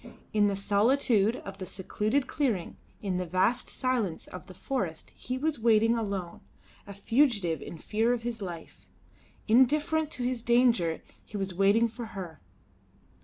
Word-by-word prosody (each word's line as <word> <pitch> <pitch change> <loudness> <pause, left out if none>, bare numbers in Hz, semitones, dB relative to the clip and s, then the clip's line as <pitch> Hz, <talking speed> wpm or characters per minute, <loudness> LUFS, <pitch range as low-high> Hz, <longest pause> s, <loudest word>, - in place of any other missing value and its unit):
In 210 -1 +4
the 200 - 0
solitude 215 +2 +2
of 195 0 -8
the 185 - -4
secluded 215 +9 -1
clearing, 240 - -1 0.3
in 190 -3 -1
the 180 - -2
vast 190 +8 +1
silence 240 -10 -1
of 180 - -10
the 185 - -12
forest 185 -9 -3
he 255 +1 -5
was 300 0 -1
waiting 225 0 +4
alone, 200 -6 -4 0.5
a 200 - -7
fugitive 205 - +2
in 170 - -8
fear 220 +8 0
of 240 -2 -1
his 235 -2 -4
life. 170 -4 -8 0.6
Indifferent 295 +6 +3
to 250 - -4
his 250 -1 -1
danger 235 -9 +2 0.2
he 210 - -7
was 195 -2 -3
waiting 200 +5 +4
for 230 +1 -7
her. 175 -4 -7
215 Hz, 155 wpm, -29 LUFS, 190-245 Hz, 0.6 s, In